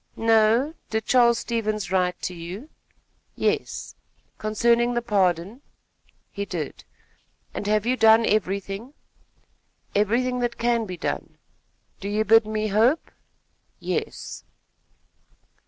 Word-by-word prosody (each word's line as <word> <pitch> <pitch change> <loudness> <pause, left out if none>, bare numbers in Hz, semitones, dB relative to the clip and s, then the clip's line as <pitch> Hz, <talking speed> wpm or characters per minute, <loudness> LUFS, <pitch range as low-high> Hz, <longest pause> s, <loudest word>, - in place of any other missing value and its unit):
"No. 225 +6 +3 0.2
Did 220 0 -2
Charles 235 -2 +4
Stevens 215 -5 -2
write 180 -1 +1
to 180 - -2
you?" 180 - -8 0.7
"Yes." - - -2 0.5
"Concerning 235 +3 +2
the 240 - +1
pardon?" 195 +1 0 0.7
"He 200 - -4
did." 170 -7 -5 0.7
"And 205 - -4
have 210 0 +2
you 250 +2 +2
done 225 -1 +6
everything?" 200 +5 -2 1.0
"Everything 245 +5 +1
that 240 -1 -2
can 235 -2 +1
be 180 -1 -6
done." - - -4 0.6
"Do 200 - -5
you 215 +1 0
bid 225 +1 +5
me 215 0 -1
hope?" 230 +10 +2 0.7
"Yes." - - -4
215 Hz, 110 wpm, -24 LUFS, 200-235 Hz, 1.0 s, done